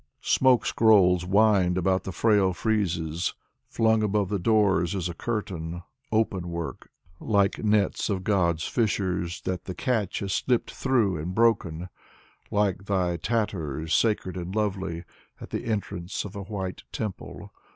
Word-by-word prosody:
Smoke 130 -3 +4
scrolls 90 -5 +4
wind 100 -3 +3
about 95 +1 +1
the 95 - -3
frail 100 -2 +3
friezes; 85 -6 -1 0.3
Flung 110 -1 +2
above 105 -2 +1
the 100 -2 -1
doors 100 -3 +2
is 90 -3 -1
a 85 - -5
curtain 85 -6 -4
— - - -44
Open 100 -5 0
work: 85 -1 -6 0.3
like 100 -2 +1
nets 105 -1 +1
of 95 -2 -1
God's 85 -5 +1
fishers 90 -7 -1
That 95 -1 -4
the 95 - -6
catch 110 -4 -1
has 95 -1 -2
slipped 125 -2 0
through 115 -9 +1
and 85 +5 -4
broken, 95 -7 +1 0.6
Like 100 -2 0
thy 90 -3 0
tatters, 80 - -2
sacred 105 -5 +1
and 90 +2 -5
lovely, 95 -5 -2 0.4
At - - -10
the - - -3
entrance 100 -5 -3
of 100 +1 -8
a 100 - -5
white 95 -2 -5
temple. 105 -4 -6
95 Hz, 145 wpm, -26 LUFS, 90-105 Hz, 0.6 s, Smoke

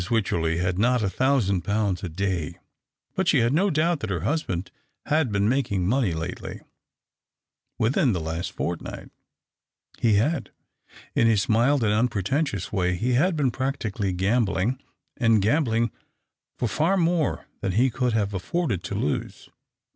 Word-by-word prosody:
Wycherley 85 -8 +1
had 90 +1 -1
not 125 +1 +3
a 100 - 0
thousand 120 -9 +2
pounds 100 0 0
a 90 - -3
day, 90 -2 -2 0.6
but 190 -1 -1
she 155 - +5
had 120 0 +2
no 190 +6 +3
doubt 165 0 +1
that 110 - -4
her 90 -5 -2
husband 100 - -2 0.3
had 150 -5 +1
been 100 0 +1
making 115 -7 0
money 120 -3 +2
lately 80 +3 -5 0.6
— - - -65 0.3
within 120 +3 +2
the 90 - -1
last 80 +2 -3
fortnight. 85 -1 -5 0.9
He 115 -3 +3
had. 130 +6 +1 0.6
In 115 - +3
his 110 -4 +2
mild 120 +4 +3
and 105 -1 +2
unpretentious 110 - 0
way 90 -3 +1
he 120 +8 0
had 170 +8 +3
been 140 -5 +1
practically 115 -7 -2
Camljlino;, 105 +4 +1 0.4
and 115 -3 +4
oamblino 115 0 +1 0.7
for 120 - 0
far 160 - +1
more 170 -4 +1
than 95 - -2
he 125 +6 +3
could 125 0 0
have 105 -2 0
afforded 110 - -1
to - - -4
lose. - - -3
115 Hz, 155 wpm, -25 LUFS, 95-135 Hz, 0.9 s, she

